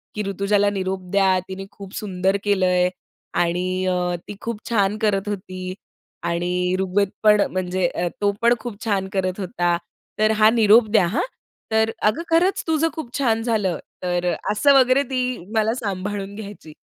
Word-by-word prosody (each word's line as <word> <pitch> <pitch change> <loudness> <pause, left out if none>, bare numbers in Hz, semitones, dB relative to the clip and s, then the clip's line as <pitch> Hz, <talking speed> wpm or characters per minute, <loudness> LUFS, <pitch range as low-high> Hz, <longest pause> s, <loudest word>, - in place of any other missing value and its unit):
की 210 - -2
"ऋतुजाला 200 +1 +2
निरोप 190 -1 -2
द्या, 190 -2 +4
तिने 195 0 -6
खूप 200 -1 -11
सुंदर 190 -1 0
केलंय 185 -3 +2 0.4
आणि 180 +2 0
अ, 180 -1 0
ती 205 - -7
खूप 230 -2 -4
छान 205 -2 +2
करत 205 -2 +1
होती 185 -2 -5 0.5
आणि 180 +1 0
ऋग्वेद 190 +1 +1
पण, 210 -1 +6
म्हणजे 185 -1 0 0.3
तो 205 0 +3
पण 235 +1 +5
खूप 225 -3 -7
छान 195 -3 0
करत 185 0 -1
होता. 175 -3 0 0.4
तर 215 0 +4
हा 215 0 +6
निरोप 220 0 +5
द्या 210 -4 +4
हां." 185 - 0 0.5
तर 220 0 +2 0.2
अगं 215 +10 +1
खरंच 350 +4 +2
तुझं 320 0 +2
खूप 300 -7 -7
छान 225 -5 +1
झालं." 205 -8 0 0.3
तर 175 0 -1
अ, - - -1 0.2
असं 280 +7 +4
वगैरे 255 +2 +4
ती 255 -1 -2 0.2
मला 220 +1 +2
सांभाळून 200 -2 -4
घ्यायची. 200 -7 -9
200 Hz, 160 wpm, -22 LUFS, 185-220 Hz, 0.5 s, पण